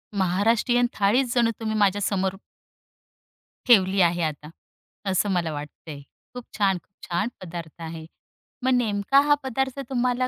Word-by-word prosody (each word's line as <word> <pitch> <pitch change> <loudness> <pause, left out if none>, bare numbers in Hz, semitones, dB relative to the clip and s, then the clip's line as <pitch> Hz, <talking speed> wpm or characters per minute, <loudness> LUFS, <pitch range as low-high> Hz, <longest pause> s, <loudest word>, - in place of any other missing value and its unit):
महाराष्ट्रीयन 215 +6 +2
थाळीच 235 +5 +2
जणू 235 -2 +3
तुम्ही 220 -1 -2
माझ्यासमोर 195 -1 +1 1.3
ठेवली 195 -5 +5
आहे 175 0 +2
आता 150 -1 -4 0.6
असं 190 +2 +1
मला 175 -3 0
वाटतंय. 145 0 -8 0.3
खूप 250 0 -7
छान, 195 -3 +2
खूप 190 +2 -16
छान 175 +5 0
पदार्थ 170 -2 -8
आहे. 160 -1 -7 0.6
मग 260 - +2
नेमका 230 +1 +2
हा 290 - +6
पदार्थ 265 +1 -2
तुम्हाला 250 0 0
200 Hz, 130 wpm, -24 LUFS, 175-245 Hz, 1.3 s, हा